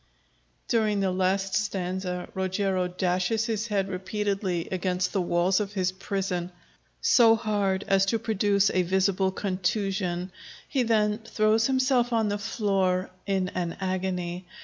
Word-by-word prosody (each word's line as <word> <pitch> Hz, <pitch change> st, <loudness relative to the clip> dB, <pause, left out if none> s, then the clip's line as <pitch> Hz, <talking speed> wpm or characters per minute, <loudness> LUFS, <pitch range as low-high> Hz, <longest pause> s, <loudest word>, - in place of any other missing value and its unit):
[_During 215 Hz, -3 st, +1 dB
the 190 Hz, -1 st, +1 dB
last 190 Hz, +1 st, 0 dB
stanza 185 Hz, -3 st, -2 dB
Rogero 190 Hz, -1 st, 0 dB
dashes 180 Hz, +4 st, 0 dB
his 225 Hz, -1 st, -2 dB
head 200 Hz, -3 st, 0 dB
repeatedly 195 Hz, -2 st, -2 dB
against 185 Hz, 0 st, -1 dB
the 195 Hz, -, +1 dB
walls 175 Hz, +2 st, +2 dB
of 205 Hz, -1 st, -3 dB
his 185 Hz, -2 st, 0 dB
prison, 190 Hz, -1 st, -2 dB
and -, -, -10 dB
finally 175 Hz, -1 st, -28 dB, 0.4 s
so 230 Hz, -2 st, +6 dB
hard 205 Hz, -3 st, -1 dB
as 195 Hz, 0 st, +3 dB
to 225 Hz, -, +2 dB
produce 205 Hz, -3 st, +2 dB
a 185 Hz, -, +2 dB
visible 190 Hz, +1 st, +1 dB
contusion. 190 Hz, -1 st, -2 dB, 0.4 s
He 270 Hz, -, 0 dB
then 215 Hz, -2 st, +2 dB
throws 220 Hz, 0 st, +2 dB
himself 260 Hz, -2 st, +2 dB
on 220 Hz, -2 st, +2 dB
the 205 Hz, 0 st, -2 dB
floor 195 Hz, -3 st, 0 dB, 0.2 s
in 190 Hz, -2 st, 0 dB
an 175 Hz, -2 st, -3 dB
agony. 185 Hz, -1 st, -3 dB
195 Hz, 145 wpm, -27 LUFS, 185-210 Hz, 0.4 s, so